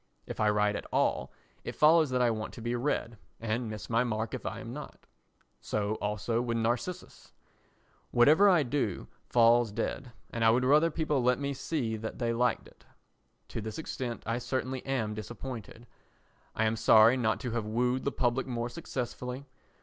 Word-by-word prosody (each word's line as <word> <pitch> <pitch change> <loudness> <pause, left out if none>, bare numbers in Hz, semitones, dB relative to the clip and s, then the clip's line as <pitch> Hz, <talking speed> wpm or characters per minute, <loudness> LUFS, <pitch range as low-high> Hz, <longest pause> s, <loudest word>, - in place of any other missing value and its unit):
If - - -7
I 105 - +3
write 105 0 +2
at - - -5
all, - - +1 0.3
it - - -6
follows 155 0 +5
that 125 -1 +1
I 120 - +3
want 110 -1 -5
to 120 - -9
be 120 +1 -1
read 120 -3 -2 0.2
and 115 +1 -2
miss 110 -1 -6
my 115 +1 +2
mark 110 -3 -2
if - - -4
I - - -4
am - - -7
not. - - -9 0.5
So 105 0 -2
also 105 +3 -1
with 120 -1 -1
Narcissus. 120 +11 -3 0.8
Whatever 155 +12 +6
I 175 -5 +5
do 125 -7 -2 0.2
falls 120 -1 +4
dead, 120 +4 -3 0.2
and 115 - -2
I 115 - +6
would 125 +3 +3
rather 150 +5 +5
people 150 -4 0
let 125 +1 +3
me 140 0 -2
see 130 -5 -2
that 110 +1 -6
they 115 -2 0
liked 125 +1 0
it. - - -21 0.7
To - - -4
this 110 0 -6
extent 125 -6 -5
I 115 +2 -1
certainly 130 +1 -3
am 115 -6 -1
disappointed. 115 +1 -7 0.7
I 110 - +1
am 110 +1 +1
sorry 110 +3 +6
not 115 -4 0
to 125 -3 -3
have 115 -2 -2
wooed 125 +3 0
the 140 - 0
public 125 +1 0
more 120 -1 -2
successfully. 125 -2 -5
120 Hz, 180 wpm, -30 LUFS, 110-130 Hz, 0.8 s, Whatever